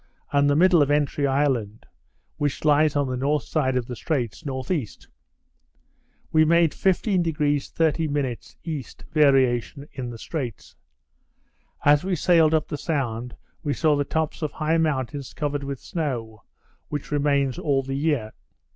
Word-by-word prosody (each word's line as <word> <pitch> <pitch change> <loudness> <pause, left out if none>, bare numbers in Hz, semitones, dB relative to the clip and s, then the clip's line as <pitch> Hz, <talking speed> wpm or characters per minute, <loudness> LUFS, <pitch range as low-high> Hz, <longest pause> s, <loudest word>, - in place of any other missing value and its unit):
and 145 0 +3
the 145 - +3
middle 175 0 +5
of 145 - +2
Entry 145 -1 +1
Island 135 -6 0 0.5
(which 145 +1 -2
lies 150 0 +4
on 145 -1 +1
the 130 - -2
north 140 +2 0
side 130 -3 0
of 125 - -1
the 125 - -6
straits) 130 -1 -3
N.E. 130 - -2 1.4
We 155 0 +5
made 170 0 +4
15° 165 -7 +1
30' 145 -6 0 0.2
E., 155 -5 -3 0.3
variation 140 -2 +2
in 125 -3 -5
the 120 - -7
straits. 125 - -6 1.1
As 145 +2 +5
we 190 0 0
sailed 160 -1 +4
up 155 - 0
the 150 - -5
sound 125 -7 -2 0.3
we 145 - -1
saw 155 -2 +3
the 145 - +1
tops 160 +3 -2
of 155 -3 -2
high 160 +1 +1
mountains 140 -3 -2
covered 145 -2 -2
with 140 -2 -5
snow, 120 - -4 0.4
which 145 -1 -5
remains 140 -3 +1
all 135 -2 +1
the 135 +1 -5
year. 140 -6 0
145 Hz, 145 wpm, -24 LUFS, 130-155 Hz, 1.4 s, middle